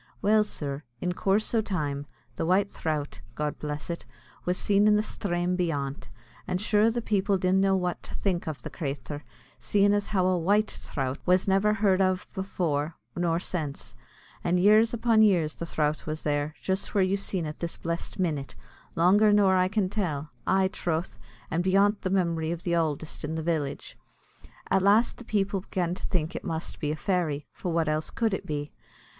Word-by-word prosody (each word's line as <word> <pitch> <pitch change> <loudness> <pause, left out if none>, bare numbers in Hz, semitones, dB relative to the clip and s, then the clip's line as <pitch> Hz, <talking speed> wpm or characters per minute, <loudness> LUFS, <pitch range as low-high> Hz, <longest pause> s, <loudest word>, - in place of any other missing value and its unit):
Well, 215 +1 +4
sir, 145 -8 -4 0.2
in 180 - -1
coorse 195 +5 +1
o' 225 - +4
time, 145 -9 -3 0.3
the - - -2
White 185 +5 +3
Throut, 155 -6 -3
God 150 -1 -2
bless 150 0 -4
it, 170 -1 -4 0.4
was 180 +1 0
seen 205 +2 +3
in 210 - +6
the 210 - +2
sthrame 180 -4 -1
beyant, 140 -7 -2 0.4
and 180 - -1
sure 210 +2 +3
the 235 0 -2
people 200 -2 +1
didn't 185 +1 +2
know 195 0 +3
what 180 -2 -1
to - - -9
think 180 -5 -1
av 145 -6 -5
the - - -6
crathur, 145 -2 -5 0.4
seein' 205 0 +3
as 205 0 0
how 190 -3 +1
a 185 -1 +2
white 205 +5 +2
throut 135 0 -4
was 180 +2 +3
never 195 +2 +3
heard 195 -2 +3
av 185 -1 +1
afor, 165 -5 -1 0.2
nor 170 -1 +1
since; 155 -6 -4 0.5
and 175 +1 +2
years 215 +4 +5
upon 230 -1 +3
years 175 -8 +4
the 170 - -6
throut 150 -1 -1
was 155 0 -4
there, 145 +1 -1
just 190 +2 -2
where 195 - +5
you 185 +1 +2
seen 195 -3 -2
it 150 0 -6
this 170 -1 -4
blessed 170 0 -4
minit, 150 -7 -2 0.4
longer 200 +5 +5
nor 200 -2 +5
I 185 0 +3
can 205 -1 0
tell 160 -8 -2 0.2
aye 190 0 +3
throth, 170 +1 -2 0.3
and 170 +2 +1
beyant 200 +2 +3
the 185 - -1
memory 170 -4 +1
o' - - 0
th' 175 +1 -6
ouldest 160 -2 -1
in 155 +2 -3
the 160 - -3
village. 155 -4 -2 0.8
At 195 - +4
last 205 +5 +4
the 245 - -11
people 200 -3 0
began 180 -2 -2
to 185 - -6
think 165 -4 -1
it - - -4
must 165 -3 -4
be 150 - -1
a - - -1
fairy; 155 -4 -1
for 180 - -4
what 165 -1 +1
else 155 0 0
could 225 -3 0
it - - -3
be? 145 -1 -3
180 Hz, 195 wpm, -27 LUFS, 155-200 Hz, 0.8 s, in